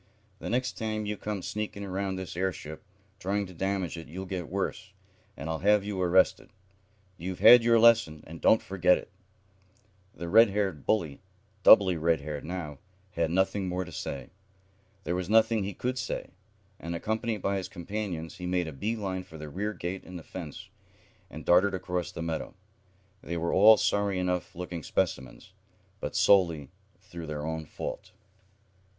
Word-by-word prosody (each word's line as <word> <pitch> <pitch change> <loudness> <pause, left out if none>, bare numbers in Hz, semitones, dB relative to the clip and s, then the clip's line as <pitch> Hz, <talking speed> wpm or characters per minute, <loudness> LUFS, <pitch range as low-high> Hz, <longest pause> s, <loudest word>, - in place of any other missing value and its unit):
"The - - -5
next 125 +2 -1
time 110 -1 -2
you 105 0 -2
come 105 -2 -4
sneaking 105 -1 -4
around 95 0 -2
this 95 -2 -6
airship, 85 -4 -3 0.4
trying 100 +2 -1
to 90 - -11
damage 95 -1 -2
it, 80 - -10
you'll 95 +4 -6
get 90 -2 -5
worse, 95 +1 -3 0.4
and - - -6
I'll 80 -1 -2
have 105 +1 +4
you 100 -2 -3
arrested. 90 +1 +3 0.7
You've 90 +2 -5
had 120 -1 +9
your 115 0 +5
lesson, 110 -10 +4
and 80 +1 -10
don't 110 - +5
forget 90 -1 +3
it." - - -10 1.0
The 85 - -6
red 115 +5 +7
haired 95 -7 -2
bully, 85 -10 0 0.4
doubly 95 -3 +7
red 80 -1 +1
haired 75 0 -5
now, 80 -5 -5 0.3
had 85 -2 0
nothing 95 +2 +1
more 90 +1 -2
to 90 - -11
say. 70 -2 -6 0.7
There 85 - -2
was 90 0 -3
nothing 110 -1 +4
he 100 -1 -5
could 130 +1 -2
say, - - -4 0.5
and, 85 +1 -5
accompanied 110 +3 -2
by 100 0 +1
his 95 - -4
companions, 90 -2 -5
he 90 -1 -5
made 90 -1 0
a 80 - -6
bee 105 +12 -2
line 95 -4 -3
for 80 - -12
the 75 -1 -8
rear 105 +7 -2
gate 90 0 -5
in 90 - -11
the 85 - -7
fence, 80 -5 -8 0.6
and - - -9
darted 95 +3 +4
across 90 -1 -3
the 80 - -5
meadow. 80 +2 -4 0.7
They 85 - -4
were 85 +1 -1
all 110 +3 +8
sorry 100 -2 +1
enough 90 -1 -2
looking 90 -1 -5
specimens, 65 -3 -3 0.5
but - - -5
solely 85 -8 +3 0.3
through 85 -2 -9
their 75 -1 -4
own 80 -1 -4
fault. 95 +4 -6
95 Hz, 170 wpm, -28 LUFS, 85-100 Hz, 1.0 s, had